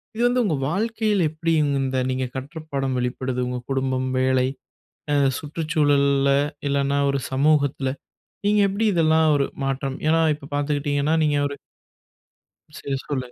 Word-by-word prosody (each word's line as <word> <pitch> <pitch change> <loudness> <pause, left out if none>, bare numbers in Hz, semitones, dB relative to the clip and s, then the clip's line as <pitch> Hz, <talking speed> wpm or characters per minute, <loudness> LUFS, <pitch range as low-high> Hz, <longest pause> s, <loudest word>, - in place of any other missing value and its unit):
இது 230 - -3
வந்து 245 +1 +2
உங்க 165 - +1
வாழ்க்கையில 215 0 0
எப்படி 165 +1 -2
இவுங்க 145 -2 +1
இந்த 130 0 -2
நீங்க 130 0 -1
கற்ற 140 +5 -6
பாடம் 135 -2 -1
வெளிப்படுது? 125 +1 -2
உங்க 125 0 -3
குடும்பம், 130 -1 0
வேலை 130 0 +2 0.7
அ - - +3 0.2
சுற்றுச்சூழல்ல 145 -3 +1 0.4
இல்லனா 140 0 +1
ஒரு 140 - 0
சமூகத்தில, 140 -1 +2 0.6
நீங்க 210 0 +3
எப்படி 210 +3 -1
இதெல்லாம் 160 -2 +3
ஒரு 140 -1 +2 0.2
மாற்றம் 135 0 -2
ஏன்னா 165 +1 +4 0.2
இப்ப 140 -1 -13
பார்த்துக்கிட்டீங்கன்னா 145 +1 0
நீங்க 145 -1 +2
ஒரு 140 0 -7 1.2
சரி. 140 -1 -3
சொல்லுங்க. 130 -4 -3
140 Hz, 140 wpm, -23 LUFS, 135-160 Hz, 1.2 s, ஏன்னா